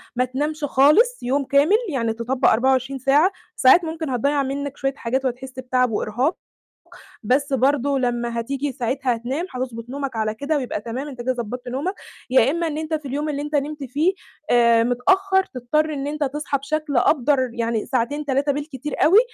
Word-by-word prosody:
ما 250 Hz, -, +2 dB
تنامش 295 Hz, +4 st, -3 dB
خالص 300 Hz, -, +4 dB
يوم 275 Hz, +3 st, +1 dB
كامل، 285 Hz, +10 st, +4 dB
يعني 230 Hz, -6 st, -1 dB
تطبّق 245 Hz, +4 st, +1 dB
24 265 Hz, +3 st, +1 dB
ساعة، 290 Hz, +9 st, +4 dB, 0.2 s
ساعات 265 Hz, +7 st, +6 dB
ممكن 320 Hz, -2 st, -4 dB
هتضيّع 280 Hz, +3 st, +1 dB
منّك 280 Hz, +1 st, -4 dB
شوية 270 Hz, 0 st, -1 dB
حاجات 260 Hz, +2 st, -2 dB
وهتحس 260 Hz, +1 st, -3 dB
بتعب 255 Hz, -1 st, +1 dB
وإرهاق، 240 Hz, -, 0 dB, 0.9 s
بس 275 Hz, +5 st, +1 dB
برضه 275 Hz, +1 st, +2 dB
لمّا 240 Hz, -1 st, -1 dB
هتيجي 275 Hz, +4 st, -3 dB
ساعتها 255 Hz, 0 st, -1 dB
هتنام 260 Hz, +9 st, -3 dB
هتضبط 245 Hz, -2 st, -5 dB
نومك 275 Hz, -2 st, -4 dB
على 215 Hz, -1 st, -1 dB
كده 290 Hz, +4 st, -1 dB
ويبقى 250 Hz, -6 st, -3 dB
تمام 250 Hz, +6 st, -5 dB
أنت 255 Hz, -4 st, -7 dB
كده 255 Hz, +1 st, 0 dB
ضبّطت 245 Hz, +1 st, -6 dB
نومك، 285 Hz, +10 st, -2 dB, 0.3 s
يا 260 Hz, +1 st, +4 dB
إمّا 335 Hz, 0 st, -1 dB
إن 300 Hz, -, -3 dB
أنت 315 Hz, 0 st, -4 dB
في 305 Hz, -2 st, -2 dB
اليوم 290 Hz, +3 st, -2 dB
اللي 290 Hz, -1 st, -2 dB
أنت 295 Hz, +1 st, -3 dB
نمت 290 Hz, 0 st, -2 dB
فيه 295 Hz, +9 st, +1 dB, 0.4 s
آآ 235 Hz, -1 st, +5 dB
متأخّر 380 Hz, +11 st, +2 dB
تضطر 305 Hz, +5 st, 0 dB
إن 275 Hz, 0 st, -3 dB
أنت 300 Hz, +1 st, -2 dB
تصحى 285 Hz, 0 st, -2 dB
بشكل 295 Hz, 0 st, -2 dB
أبدَر 260 Hz, -1 st, +2 dB
يعني 230 Hz, -2 st, -1 dB
ساعتين، 270 Hz, +4 st, -1 dB
3 280 Hz, +1 st, +1 dB
بالكتير 290 Hz, -1 st, -5 dB
أوي، 375 Hz, +7 st, +7 dB
270 Hz, 175 wpm, -22 LUFS, 250-295 Hz, 0.9 s, أوي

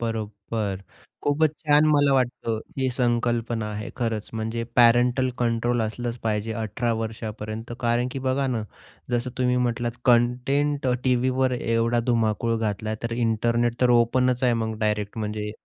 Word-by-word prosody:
बरोबर. 105 Hz, -3 st, -3 dB, 0.4 s
खूपच 150 Hz, +2 st, +2 dB
छान 150 Hz, 0 st, +4 dB
मला 145 Hz, -2 st, +4 dB
वाटतं 120 Hz, -3 st, 0 dB, 0.2 s
ही 130 Hz, -1 st, +1 dB
संकल्पना 120 Hz, -2 st, 0 dB
आहे. 105 Hz, 0 st, -5 dB
खरंच 115 Hz, -4 st, -2 dB
म्हणजे 115 Hz, +1 st, -2 dB
पॅरेंटल 120 Hz, +2 st, +5 dB
कंट्रोल 120 Hz, 0 st, +1 dB
असलंच 120 Hz, +2 st, -3 dB
पाहिजे 110 Hz, 0 st, -1 dB
18 115 Hz, +2 st, -1 dB
वर्षापर्यंत 110 Hz, 0 st, -5 dB
कारण 120 Hz, +1 st, +1 dB
की -, -, -4 dB
बघा 135 Hz, +1 st, +1 dB
ना, 120 Hz, -4 st, -1 dB, 0.5 s
जसं 120 Hz, +1 st, -1 dB
तुम्ही 125 Hz, 0 st, +2 dB
म्हटलात, 120 Hz, -1 st, 0 dB
कंटेंट 130 Hz, +4 st, +2 dB
अ, 125 Hz, -, +3 dB
टीव्हीवर 130 Hz, 0 st, +2 dB
एवढा 115 Hz, +1 st, +1 dB
धुमाकूळ 115 Hz, 0 st, +1 dB
घातला 110 Hz, 0 st, -2 dB
तर 115 Hz, -, -2 dB
इंटरनेट 115 Hz, +1 st, 0 dB
तर 125 Hz, -, +4 dB
ओपनच 125 Hz, +2 st, +3 dB
आहे 125 Hz, -1 st, +4 dB
मग 110 Hz, -1 st, -4 dB
डायरेक्ट 105 Hz, 0 st, -1 dB
म्हणजे 105 Hz, 0 st, -3 dB
120 Hz, 140 wpm, -25 LUFS, 110-125 Hz, 0.5 s, पॅरेंटल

